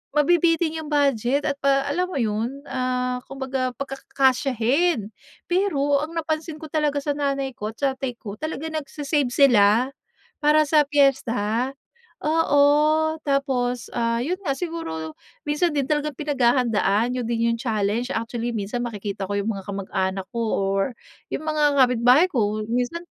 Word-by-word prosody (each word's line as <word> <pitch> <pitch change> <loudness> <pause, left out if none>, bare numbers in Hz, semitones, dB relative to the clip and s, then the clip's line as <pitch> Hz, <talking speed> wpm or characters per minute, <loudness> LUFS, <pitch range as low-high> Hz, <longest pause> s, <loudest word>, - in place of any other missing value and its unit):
mabibitin 330 +1 +3
yung 305 - -8
budget 280 -2 +1
at 280 -1 -2
pa 275 0 +2
alam 355 +6 -1
mo 365 - -7
yun, 235 +3 -2
ah, 250 -2 -2
kumbaga 265 -2 -3
pagkakasyahin 270 - 0 0.4
pero 290 -7 +2
ang 315 +2 -5
napansin 315 0 -2
ko 315 - -9
talaga 300 -2 +1
sa 290 - 0
nanay 275 -2 -1
ko, 215 -3 -5
tatay 265 -2 -2
ko, 205 -4 -8
talagang 315 0 -4
nagse-save 290 -2 -1
sila 245 -2 +4 0.5
para 305 +1 +4
sa 300 -1 +3
piyesta. 255 -4 +1 0.5
Oo, 305 0 +3
tapos, 260 -4 -1
ah, 230 0 0
yun 340 +11 -2
nga, 275 -8 -2
siguro 160 - -5 0.3
minsan 300 +4 +1
din 290 -3 -1
talagang 295 -1 -1
pinaghahandaan, 245 -5 +1
yun 250 -2 -3
din 230 0 +1
yung 230 - -4
challenge. 220 +1 -1
Actually 235 -1 -3
minsan 210 +4 -3
makikita 205 -4 -4
ko 205 - -1
yung 210 +3 -1
mga 195 0 -8
kamag-anak 190 -1 -2
ko 235 - -2 0.2
or 195 0 +1 0.5
yung 310 - -4
mga 300 -2 +2
kapitbahay 250 +4 +5
ko, 215 - -1
minsan 250 +9 -2
270 Hz, 140 wpm, -23 LUFS, 230-295 Hz, 0.5 s, kapitbahay